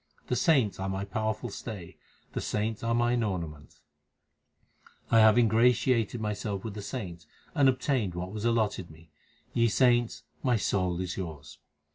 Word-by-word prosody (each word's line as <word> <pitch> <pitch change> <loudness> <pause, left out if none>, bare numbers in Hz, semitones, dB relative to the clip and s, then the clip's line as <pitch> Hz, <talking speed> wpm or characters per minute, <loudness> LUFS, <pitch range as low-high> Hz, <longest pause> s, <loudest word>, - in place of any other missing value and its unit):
The 125 - +1
saints 130 - +3
are 95 0 -2
my 95 +1 -2
powerful 110 +3 -2
stay; 100 -6 -7 0.4
the - - -2
saints 105 +1 -2
are 115 0 +1
mine 120 0 +2
ornaments. 85 -8 -4 1.3
I 115 - +6
have 110 0 +7
ingratiated 120 0 +3
myself 105 -2 -3
with 110 - -5
the 105 - -6
saints, 90 - -6 0.3
And 140 -2 +5
obtained 130 -7 0
what 90 +1 -4
was 105 0 -5
allotted 110 -6 0
me. 80 0 -17 0.4
Ye 115 0 +3
saints, 120 0 +2 0.2
my 125 -2 +2
soul 90 -3 0
is 90 -1 -4
yours. 75 -5 -7
105 Hz, 150 wpm, -29 LUFS, 95-120 Hz, 1.3 s, have